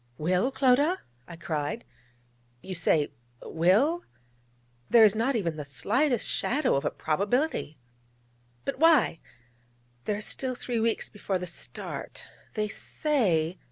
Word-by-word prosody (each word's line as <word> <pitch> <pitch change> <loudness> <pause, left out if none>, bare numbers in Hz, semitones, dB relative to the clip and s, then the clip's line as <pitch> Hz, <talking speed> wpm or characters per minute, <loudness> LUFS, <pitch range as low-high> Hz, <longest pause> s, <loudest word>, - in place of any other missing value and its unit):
'"Will," 180 - +1
Clodagh?' 275 +6 +3 0.3
I 170 - -9
cried. 155 +5 -3 0.8
'You 190 - -6
say 160 -3 +1 0.3
"will"? 215 - +2 0.9
there 230 -2 +7
is 210 -2 +7
not 235 +5 0
even 170 -8 -1
the 150 - -4
slightest 230 - +1
shadow 275 +2 +1
of 140 - 0
a - - +1
probability 200 - -1 0.4
!' 120 0 -37
'But 275 - -3
why? 310 - +5 0.9
There 205 - 0
are - - -6
still 255 +4 0
three 240 -1 -2
weeks 225 0 0
before 200 -2 -3
the 180 - -5
start. 170 - -6 0.3
They 215 -1 0
say...' 190 - 0
210 Hz, 130 wpm, -28 LUFS, 165-260 Hz, 0.9 s, there